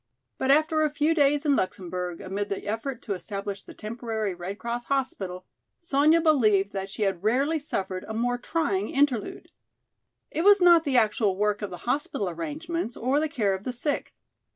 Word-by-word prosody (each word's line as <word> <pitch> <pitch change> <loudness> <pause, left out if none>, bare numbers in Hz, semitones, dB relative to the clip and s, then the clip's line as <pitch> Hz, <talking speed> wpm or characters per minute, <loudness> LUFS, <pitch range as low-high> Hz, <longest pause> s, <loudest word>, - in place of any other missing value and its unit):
But 265 - 0
after 310 +2 +4
a 305 - +3
few 295 +2 +1
days 290 -1 +2
in 285 -2 +4
Luxemburg, 180 -3 -3
amid 200 +2 -3
the 195 - -4
effort 230 +5 -4
to 205 - -2
establish 200 +1 -5
the - - -13
temporary 220 -2 -3
Red 180 +3 -6
Cross 235 +1 -4
hospital, 195 -10 -2 0.3
Sonya 315 0 +3
believed 215 - +3
that 195 0 -4
she 215 +2 -3
had 195 -3 0
rarely 275 +9 +2
suffered 190 -10 -3
a 220 - -5
more 245 +2 0
trying 235 - -1
interlude. 270 -6 0 0.8
It 325 - -1
was 405 +1 +7
not 345 -2 +6
the 270 -3 +2
actual 210 -3 +2
work 210 +1 +1
of 205 - -3
the 180 -1 -10
hospital 245 -6 -1
arrangements 295 - -4
or 260 +5 +1
the 310 0 0
care 215 -10 +1
of 190 +1 -5
the 250 - -3
sick. 285 +5 -3
235 Hz, 180 wpm, -26 LUFS, 200-290 Hz, 0.8 s, was